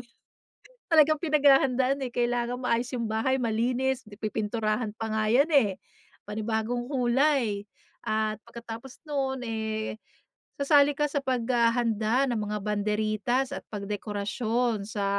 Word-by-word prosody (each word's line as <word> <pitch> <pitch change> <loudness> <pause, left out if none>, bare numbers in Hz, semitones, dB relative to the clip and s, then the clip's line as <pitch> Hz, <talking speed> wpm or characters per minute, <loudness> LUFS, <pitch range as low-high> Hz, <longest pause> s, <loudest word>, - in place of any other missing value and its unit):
yu 240 - -14 0.8
talagang 310 -1 +5
pinaghahandaan 275 -3 +3
eh, 255 - -3
kailangan 240 0 -1
maayos 235 +1 +1
yung 235 - -1
bahay, 225 +5 0
malinis, 250 +3 0
pi-pipinturahan 215 +1 -2
pa 225 - -3
nga 215 0 +1
yan, 270 +6 +5
eh. 205 -9 +3 0.5
Panibagong 220 +4 -2
kulay, 250 -4 +2 0.4
at 215 0 -1
pagkatapos 235 +2 -9
no'n, 270 -3 -1
eh, 220 -1 -3 0.5
sasali 285 0 +4
ka 295 - +1
sa 285 -1 0
paghahanda 235 -2 +1
ng 225 - -1
mga 210 0 -3
banderitas, 215 +4 0
at - - -4
pagdekorasyon 210 +2 -2
sa 205 -2 -3
235 Hz, 120 wpm, -27 LUFS, 215-265 Hz, 0.8 s, talagang